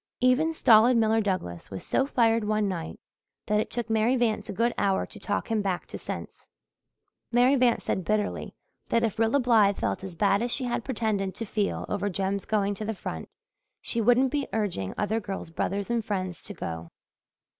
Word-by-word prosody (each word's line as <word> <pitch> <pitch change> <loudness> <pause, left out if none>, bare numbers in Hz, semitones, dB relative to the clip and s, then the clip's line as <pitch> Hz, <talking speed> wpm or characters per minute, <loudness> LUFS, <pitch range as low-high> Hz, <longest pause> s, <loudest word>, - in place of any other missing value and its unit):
Even 255 +6 +3
stolid 235 -5 +5
Miller 225 0 +3
Douglas 185 - -3
was 95 - -7
so 270 - +1
fired 230 -4 +2
one 215 0 +1
night 175 -4 -4 0.5
that 210 0 +2
it - - -1
took 240 -2 -3
Mary 225 +3 +2
Vance 235 -4 0
a - - -1
good 230 +4 +1
hour 195 -1 +1
to 210 - -12
talk 205 +3 -2
him 220 -2 +2
back 190 -3 -2
to - - -8
sense. - - -7 0.8
Mary 245 +3 +5
Vance 250 -3 +2
said 190 - -1
bitterly 210 +2 -1 0.3
that 230 0 +2
if 220 -2 -1
Rilla 225 +5 +3
Blythe 220 -5 +4
felt - - -2
as 190 -3 -7
bad 200 +3 +2
as 240 - -1
she 265 - -1
had 240 -2 -2
pretended 215 -6 -1
to 225 - -4
feel 205 -1 -1
over 205 0 -1
Jem's 195 +1 -2
going 205 -2 +1
to 215 +2 -5
the 220 +1 -2
front 80 - -6 0.5
she 230 - -2
wouldn't 245 +3 +4
be 285 -2 -1
urging 190 - -2
other 215 +2 0
girls' 195 -5 -6
brothers 200 +6 -2
and 235 -1 0
friends 185 -4 -3
to 205 - -7
go. 80 - -6
215 Hz, 195 wpm, -27 LUFS, 195-235 Hz, 0.8 s, stolid